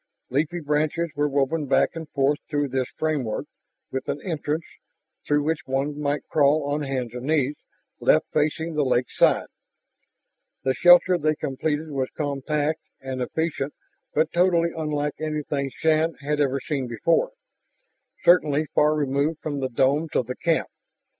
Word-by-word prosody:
Leafy 155 +6 0
branches 155 +2 0
were 145 +1 +1
woven 145 +2 0
back - - +3
and 160 -2 -7
forth 140 +1 +1
through 145 -1 0
this 130 -1 -1
framework, 145 -8 -1 0.5
with 130 0 -4
an - - -1
entrance, 160 -2 -2 0.6
through 145 0 +2
which 155 -1 -2
one 140 +3 -1
might 145 0 -1
crawl 150 0 +3
on 145 +1 -1
hands 130 -4 -3
and 125 +2 -6
knees, 150 -2 +2 0.4
left - - +4
facing 155 +2 0
the 150 -1 +1
lakeside. 125 -2 +2 1.2
The 130 - +2
shelter 175 +3 +6
they 155 0 +1
completed 150 +3 -2
was 135 -2 -1
compact 150 +2 -1 0.2
and 130 -1 -5
efficient 145 +1 -2 0.4
but 155 +1 +1
totally 170 -1 +3
unlike 150 -2 -1
anything 150 -3 -2
Shann 160 +3 +1
had 150 +1 -2
ever 140 -1 +1
seen 135 -3 -3
before, 165 - +1 0.9
certainly 155 -4 +4
far 150 +1 +4
removed 145 +2 0
from 145 -2 -3
the 130 -1 -1
domes 140 +6 +1
of 125 - +2
the 125 +2 -5
camp. 165 -2 0
150 Hz, 145 wpm, -24 LUFS, 135-155 Hz, 1.2 s, shelter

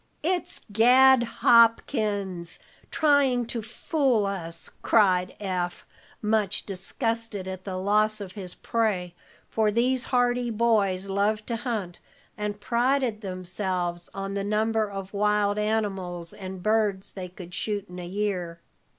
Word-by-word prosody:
"It's 355 +2 -1
Gad 250 +4 +6
Hopkins, 215 - +2 0.3
tryin' 280 -5 +3
to 230 0 -4
fool 245 0 0
us!" 170 -4 -3
cried 185 -4 +3
Eph, 180 -3 -3 0.4
much 210 -2 +1
disgusted 215 +1 -3
at 185 0 -6
the 190 -2 -4
loss 215 +3 +2
of 195 -3 -7
his 185 -2 -7
prey, 205 -7 -1 0.3
for 220 -1 +1
these 245 +4 +1
hardy 245 -1 +1
boys 210 -4 +1
loved 205 +2 0
to 235 - 0
hunt, 220 -7 -4 0.4
and 210 -1 -4
prided 240 0 +1
themselves 185 -2 -3
on 195 0 -5
the 200 0 -2
number 215 +1 +1
of 195 0 -7
wild 210 0 +2
animals 195 -5 -2
and 190 -2 -8
birds 210 -3 +1
they 185 -2 -7
could 180 -1 -11
shoot 205 0 -2
in 180 0 -9
a 175 - -6
year. 180 -3 -2
210 Hz, 130 wpm, -26 LUFS, 185-230 Hz, 0.4 s, Gad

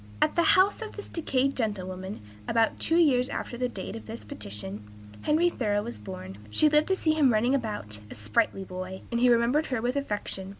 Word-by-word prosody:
At - - +3
the 340 - +3 0.2
house 390 +4 +4
of 445 - -6
this 415 - -6
decayed 275 -4 0
gentlewoman, 190 -4 -3 0.3
about 225 -1 +2
two 325 - +1
years 265 -6 +4
after - - -4
the 250 +1 -1
date 200 -1 -6
of 225 - -9
this 225 +1 -7
petition, 105 - -7 0.4
Henry 320 +4 +3
Thoreau 210 -10 0
was 115 -3 -7
born. 95 -1 -8
She 305 - +4
lived 300 +1 +3
to 380 - +2
see 320 -4 +2
him 295 -5 +4
running 235 +4 +2
about, 210 - -2
a - - -8
sprightly 105 - 0
boy, 185 0 -7
and 235 - 0
he 250 +1 +5
remembered 240 +6 +3
her 255 -3 -1
with 245 +3 -1
affection. 205 -7 -3
235 Hz, 205 wpm, -28 LUFS, 190-280 Hz, 0.4 s, he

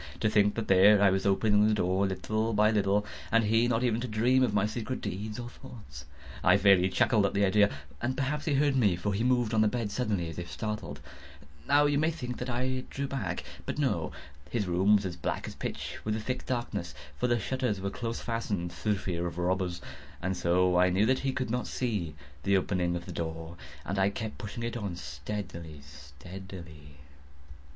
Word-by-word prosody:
To 110 - +1
think 105 -1 +3
that 115 -2 -3
there 100 +2 +7
I 100 -1 +5
was, 95 +1 0
opening 105 +1 +4
the 110 - +3
door, 95 0 +1
little 110 +4 -1
by 105 +1 +4
little, 105 -1 +2 0.3
and 115 0 +4
he 115 +3 +3
not 120 0 +1
even 120 -2 +1
to 125 - -3
dream 120 +4 +3
of 125 - +3
my 105 -1 +2
secret 115 +4 -3
deeds 105 +5 -5
or 120 - -5
thoughts. 105 - -11 0.4
I - - +6
fairly 95 -2 +5
chuckled 105 +3 +3
at - - -5
the 100 0 +4
idea; 100 +1 +4 0.3
and 130 +2 -1
perhaps 145 +3 -1
he 150 -4 +1
heard 140 0 +3
me; 105 -8 +3
for 100 +4 -2
he 105 +4 0
moved 125 -3 +2
on 110 - +4
the 110 - +5
bed 115 -2 -2
suddenly, 105 -9 -1
as 80 +1 -6
if 85 0 -6
startled. 105 -5 -4 0.7
Now 145 +1 +5
you 145 -1 +2
may 155 +1 +3
think 125 -7 -5
that 125 - -4
I 130 +1 -1
drew 140 - -3
back—but 105 -11 -5
no. - - 0 0.4
His 115 -4 -1
room 95 +4 +4
was 100 -1 +1
as 90 -2 -3
black 85 - -3
as - - -6
pitch - - -5
with 105 0 -1
the - - -2
thick 125 +4 -4
darkness, 115 -8 -3 0.2
(for - - +2
the 120 -1 +2
shutters 125 -2 -1
were 100 +1 -3
close 115 +1 -4
fastened, 105 -7 -2
through 105 -2 0
fear 85 -2 -2
of 85 -1 -7
robbers,) 90 0 -1 0.4
and 95 +1 -2
so 90 +1 +2
I 90 0 +5
knew 95 +4 +3
that 130 +3 +2
he 135 - 0
could 130 -3 -3
not 125 +1 -1
see 105 - -2 0.3
the 100 +5 +3
opening 90 -2 0
of 85 0 -5
the 90 - -7
door, 80 0 -5 0.3
and 95 +4 -2
I 95 +1 +4
kept 110 +1 -5
pushing 115 +1 -6
it 115 0 -3
on 100 -6 -3
steadily, 80 +1 -6
steadily. 75 +2 -11
105 Hz, 210 wpm, -29 LUFS, 90-120 Hz, 0.7 s, there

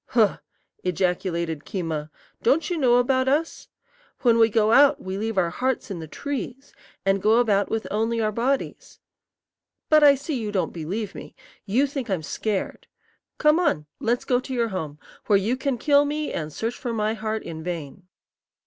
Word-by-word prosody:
"Huh!" 220 -5 +2 0.4
ejaculated 175 -3 -1
Keema; 160 -3 -4 0.3
"don't 295 +9 +2
you 350 - 0
know 250 -4 +4
about 260 +1 +2
us? 305 +4 0 0.5
When 235 -3 +4
we 225 0 +6
go 220 0 +2
out 280 +4 +6
we 190 0 -5
leave 220 +1 -3
our 175 -2 +2
hearts 260 -2 -2
in 185 - -4
the 160 - -7
trees, 270 - -6 0.3
and 195 0 +2
go 220 +3 +4
about 205 -4 +2
with 225 0 -2
only 225 +2 0
our 215 -1 +1
bodies. 250 +6 -2 0.9
But 305 -1 +6
I 285 -1 +8
see 275 -2 -4
you 210 -1 -3
don't 190 -3 -1
believe 190 +6 -4
me. - - -10 0.3
You 240 +8 +3
think 270 -4 -5
I'm 185 -5 -1
scared. 205 +5 -3 0.5
Come 300 +2 +4
on; 155 - +1
let's 240 +2 0
go 245 -1 +2
to 260 +1 -7
your 235 -2 +1
home, 155 -7 -5 0.3
where 205 - +5
you 215 +6 0
can 265 -1 -2
kill 285 +2 +4
me 300 +1 -2
and 155 -1 -4
search 225 +9 -3
for 240 -2 -3
my 215 -1 0
heart 220 0 -3
in 160 -1 -7
vain." 175 +1 -6
225 Hz, 180 wpm, -24 LUFS, 190-260 Hz, 0.9 s, I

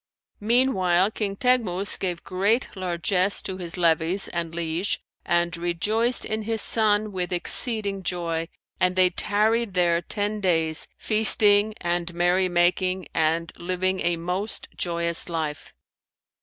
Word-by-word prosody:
Meanwhile, 205 -5 +1
King 205 -3 -4
Teghmus 205 -6 +2
gave 175 -3 -4
great 200 +7 -1
largesse 185 +1 -1
to 190 -1 -6
his 175 -1 -6
levies 170 +2 0
and 170 -1 -5
liege 170 +3 -3 0.3
and 175 0 0
rejoiced 205 +8 0
in 220 0 -3
his 220 0 -1
son 215 -1 +3
with 185 -1 -5
exceeding 200 +2 +6
joy, 170 -2 -4 0.3
and 180 0 0
they 185 -1 +3
tarried 215 +2 -1
there 170 -1 +1
ten 210 +3 -3
days, 165 -4 +1
feasting 215 -1 +3
and 175 0 -3
merry 180 +2 +1
making 180 +1 -1
and 160 +1 -1
living 185 +2 -2
a 170 0 -1
most 180 +5 -4
joyous 170 0 -1
life. 155 -3 -5
185 Hz, 130 wpm, -23 LUFS, 170-205 Hz, 0.3 s, exceeding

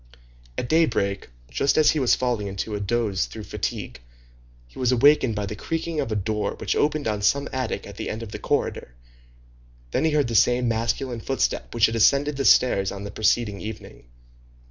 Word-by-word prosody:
At 120 - -2
daybreak, 120 -12 +1 0.2
just 140 - +1
as 155 - +5
he 155 - -1
was 130 -3 +3
falling 120 -5 -1
into 100 +2 -4
a 105 - -2
doze 100 - -1
through - - -9
fatigue, - - -5 0.7
he - - -14
was 125 -1 +2
awakened 130 -2 +4
by 105 -1 -2
the 105 - -5
creaking 165 +6 -3
of 115 - -2
a - - 0
door 105 0 -2
which - - -2
opened 150 -2 0
on 105 -2 -1
some 140 +7 +2
attic 130 -6 -3
at 100 0 -11
the - - -4
end 110 +2 -5
of 110 - -9
the - - -6
corridor, - - -2 1.0
then - - 0
he 160 - +3
heard 150 -4 +1
the 115 - -4
same 120 +3 +3
masculine 115 +2 -1
footstep 135 +4 -2
which 115 -1 +5
had 115 - -1
ascended 140 +6 +3
the 135 - -1
stairs 100 -6 +4
on 100 0 -7
the 100 - -6
preceding 110 -1 0
evening. 105 - -9
115 Hz, 195 wpm, -24 LUFS, 105-135 Hz, 1.0 s, as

